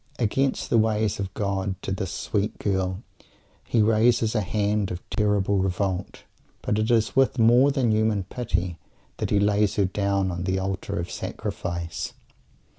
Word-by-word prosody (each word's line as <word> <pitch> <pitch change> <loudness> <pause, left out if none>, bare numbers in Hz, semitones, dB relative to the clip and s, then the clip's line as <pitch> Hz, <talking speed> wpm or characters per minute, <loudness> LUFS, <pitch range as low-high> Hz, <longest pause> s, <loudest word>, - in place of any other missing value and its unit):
Against 135 +3 0
the 115 - +5
ways 110 -2 +1
of 95 -1 -3
God 95 -2 -2
to - - -3
this 95 0 -2
sweet 100 +2 -2
girl 95 0 -1 0.6
he 115 -3 +2
raises 110 +1 +3
a 110 - +1
hand 105 0 0
of 90 0 -7
terrible 100 -2 +1
revolt, 95 0 -2 0.4
but 105 - 0
it 110 +2 0
is 115 -2 +2
with 135 0 +3
more 120 +4 +5
than 135 -5 +1
human 110 -2 +1
"pity" 90 -5 -3 0.4
that - - -2
he 105 - +3
lays 105 0 +2
her 100 - +3
down 100 0 0
on 90 +1 -4
the 95 0 0
Altar 95 0 -3
of 85 - -4
Sacrifice. 85 -2 -4
100 Hz, 160 wpm, -25 LUFS, 95-110 Hz, 0.6 s, the